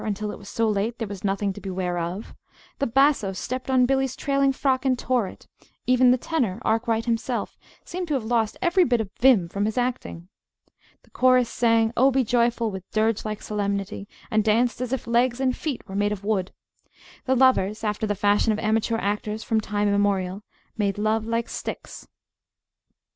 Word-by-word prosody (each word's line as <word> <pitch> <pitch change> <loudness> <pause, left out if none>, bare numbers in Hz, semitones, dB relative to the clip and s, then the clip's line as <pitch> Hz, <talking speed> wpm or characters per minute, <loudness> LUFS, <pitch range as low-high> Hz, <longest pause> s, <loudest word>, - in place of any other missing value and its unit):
until 210 0 -3
it - - -9
was 200 -1 -11
so 230 0 0
late 215 +3 -1
there 225 - -3
was 200 -2 -8
nothing 195 0 0
to 205 - -10
beware 185 -2 -3
of; 175 +6 -5 0.5
the 275 - +1
basso 270 -5 +3
stepped 255 +7 -5
on 255 -1 +4
Billy's 265 0 0
trailing 275 -1 +1
frock 265 -1 0
and 260 -2 +2
tore 245 -5 0
it; - - -12 0.4
even 255 0 +4
the 250 - +5
tenor, 245 - -1
Arkwright 225 0 +1
himself, 235 +1 -2 0.3
seemed 360 0 -5
to 300 - 0
have 250 -5 -2
lost 225 -2 0
every 360 +1 +4
bit 245 -6 +2
of 210 -3 -4
vim 235 -9 +5
from 200 +4 -2
his 220 +2 -2
acting. 245 -8 -3 0.8
The - - -26
chorus 255 -2 +3
sang 230 -1 +2
"Oh, 265 +3 +5
be 265 0 +2
joyful!" 235 -1 +1
with 190 -1 -8
dirge 220 0 0
like 215 -1 -4
solemnity, 200 -1 -3 0.2
and 215 0 +2
danced 230 +3 +1
as 250 -1 -3
if 265 - -2
legs 240 +1 +1
and 260 -1 +1
feet 280 -8 -5
were 190 - -9
made 205 +1 +1
of 205 -2 -5
wood. 200 -3 -1 0.7
The 260 - +2
lovers, 225 -5 +3
after 210 0 -1
the 205 - -1
fashion 205 +2 +2
of 215 - 0
amateur 220 +1 0
actors 210 +1 -2
from 220 -1 0
time 210 0 -1
immemorial, 200 -1 0 0.4
"made 200 -2 0
love 215 +1 0
like 230 0 -1
sticks." - - -7
225 Hz, 190 wpm, -24 LUFS, 205-250 Hz, 0.8 s, the